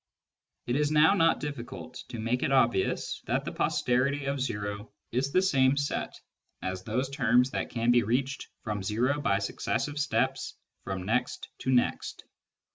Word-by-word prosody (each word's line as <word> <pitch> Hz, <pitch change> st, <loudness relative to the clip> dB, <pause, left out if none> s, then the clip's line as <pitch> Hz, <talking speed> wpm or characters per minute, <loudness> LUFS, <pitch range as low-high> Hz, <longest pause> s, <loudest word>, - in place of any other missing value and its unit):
It 120 Hz, -, -1 dB
is 145 Hz, +1 st, +2 dB
now 155 Hz, +5 st, +5 dB
not 165 Hz, -4 st, +3 dB
difficult 130 Hz, -3 st, -6 dB, 0.2 s
to 120 Hz, -, -6 dB
make 115 Hz, +3 st, -1 dB
it -, -, 0 dB
obvious 120 Hz, -7 st, +1 dB
that -, -, 0 dB
the -, -, -3 dB
posterity 135 Hz, +3 st, +1 dB
of 140 Hz, 0 st, -1 dB
o 105 Hz, 0 st, -5 dB, 0.2 s
is 130 Hz, +4 st, 0 dB
the 185 Hz, +5 st, +3 dB
same 135 Hz, -6 st, +3 dB
set 140 Hz, 0 st, -2 dB, 0.4 s
as 95 Hz, 0 st, -3 dB
those 125 Hz, +7 st, -1 dB
terms 125 Hz, -2 st, +3 dB
that -, -, -2 dB
can 115 Hz, 0 st, +1 dB
be 120 Hz, 0 st, +5 dB
reached 130 Hz, +6 st, -1 dB, 0.2 s
from 105 Hz, -3 st, -3 dB
o 130 Hz, +7 st, +1 dB
by 100 Hz, -8 st, +2 dB
successive 145 Hz, +8 st, -2 dB
steps 135 Hz, -2 st, 0 dB, 0.3 s
from 95 Hz, -2 st, -3 dB
next 115 Hz, +6 st, -1 dB
to 130 Hz, -, -1 dB
next. 125 Hz, -1 st, 0 dB
125 Hz, 160 wpm, -29 LUFS, 115-140 Hz, 0.4 s, now